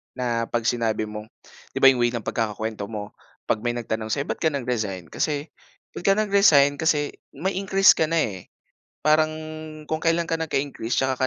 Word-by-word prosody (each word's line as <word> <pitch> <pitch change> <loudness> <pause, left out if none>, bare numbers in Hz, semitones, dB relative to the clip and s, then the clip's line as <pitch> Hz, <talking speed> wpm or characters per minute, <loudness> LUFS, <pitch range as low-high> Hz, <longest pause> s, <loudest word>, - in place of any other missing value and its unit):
na 120 -2 -1
pag 120 -1 -1
sinabi 110 -2 0
mong 105 0 -7 0.5
'di - - -2
ba, 135 - +9
yung 130 -2 +2
way 120 - +2
ng 120 -2 -4
pagkakakuwento 110 -1 -3
mo, 105 -2 -7 0.3
'pag 110 - 0
may 120 - +1
nagtanong 110 -2 -3
sa'yo, 140 +6 -1
"Ba't - - -3
ka 160 - +3
nag-resign 110 - -3
kasi 150 0 -2 0.5
ba't - - -6
ka 195 - +7
nag-resign 195 -10 +5
kasi 150 -2 +1 0.2
may 190 +2 -2
increase 195 0 +5
ka 160 - +2
na 165 - +3
eh," 100 -10 -1 0.6
parang 155 +1 +3 0.6
kung 160 0 -2
kailan 165 0 +2
ka 165 - 0
nagka-increase 140 -7 -2
tsaka 130 0 +1
130 Hz, 180 wpm, -24 LUFS, 110-160 Hz, 0.6 s, ba